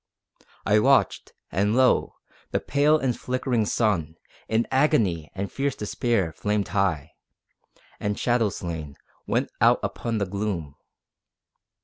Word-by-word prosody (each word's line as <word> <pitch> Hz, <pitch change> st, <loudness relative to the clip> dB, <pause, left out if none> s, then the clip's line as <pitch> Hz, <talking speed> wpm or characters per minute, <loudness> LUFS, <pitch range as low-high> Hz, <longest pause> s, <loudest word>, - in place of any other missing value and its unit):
I 105 Hz, +1 st, +4 dB
watched, 135 Hz, +5 st, +2 dB, 0.2 s
and 100 Hz, +5 st, +1 dB
lo! 130 Hz, -1 st, +3 dB, 0.3 s
the -, -, 0 dB
pale 145 Hz, +2 st, +3 dB
and 130 Hz, -5 st, -1 dB
flickering 125 Hz, -3 st, -1 dB
sun, 90 Hz, -10 st, 0 dB, 0.3 s
In 110 Hz, +1 st, +1 dB
agony 110 Hz, -, +2 dB
and 100 Hz, +1 st, -4 dB
fierce 140 Hz, -1 st, -1 dB
despair, 105 Hz, -5 st, -1 dB
flamed 105 Hz, +3 st, -1 dB
high, 90 Hz, -7 st, 0 dB, 0.9 s
And 105 Hz, 0 st, -2 dB
shadow 120 Hz, -3 st, +2 dB
slain, 80 Hz, -6 st, -6 dB, 0.3 s
went -, -, 0 dB
out -, -, +5 dB
upon 115 Hz, -1 st, -2 dB
the 100 Hz, -, 0 dB
gloom. 95 Hz, -6 st, -3 dB
105 Hz, 120 wpm, -25 LUFS, 90-125 Hz, 0.9 s, out